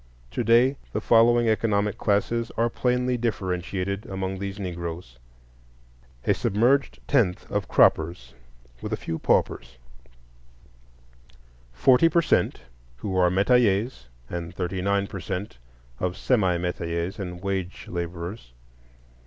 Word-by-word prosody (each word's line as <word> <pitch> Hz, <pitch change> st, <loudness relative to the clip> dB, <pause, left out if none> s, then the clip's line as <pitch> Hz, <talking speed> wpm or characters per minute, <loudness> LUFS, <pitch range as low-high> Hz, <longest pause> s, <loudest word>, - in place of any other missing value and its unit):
To -, -, -2 dB
day 120 Hz, +4 st, +4 dB, 0.2 s
the -, -, 0 dB
following 120 Hz, +1 st, +4 dB
economic 105 Hz, -2 st, +1 dB
classes 115 Hz, +3 st, 0 dB
are 115 Hz, 0 st, +2 dB
plainly 125 Hz, 0 st, 0 dB
differentiated 100 Hz, -3 st, -2 dB
among 95 Hz, 0 st, -4 dB
these 100 Hz, +1 st, -5 dB
Negroes. 85 Hz, -8 st, -6 dB, 1.1 s
A -, -, +4 dB
"submerged 125 Hz, +7 st, +1 dB
tenth" 110 Hz, -11 st, +2 dB
of -, -, -1 dB
croppers, 80 Hz, -7 st, +2 dB, 0.5 s
with -, -, -5 dB
a -, -, 0 dB
few 80 Hz, -, -4 dB
paupers; 65 Hz, -, 0 dB, 1.9 s
forty 125 Hz, -, +4 dB
per 170 Hz, 0 st, +3 dB
cent -, -, +1 dB, 0.4 s
who 95 Hz, +8 st, -4 dB
are 90 Hz, -1 st, +4 dB
metayers 100 Hz, -, +2 dB, 0.2 s
and 85 Hz, +3 st, -6 dB
thirty 90 Hz, 0 st, -3 dB
nine 100 Hz, +1 st, +1 dB
per 95 Hz, -, -7 dB
cent 90 Hz, -, -5 dB, 0.4 s
of 90 Hz, +1 st, -2 dB
semi 95 Hz, -6 st, +2 dB
metayers 85 Hz, +1 st, -3 dB
and 90 Hz, -2 st, -6 dB
wage 95 Hz, -2 st, -3 dB
laborers. 85 Hz, -, -6 dB
95 Hz, 120 wpm, -25 LUFS, 90-115 Hz, 1.9 s, day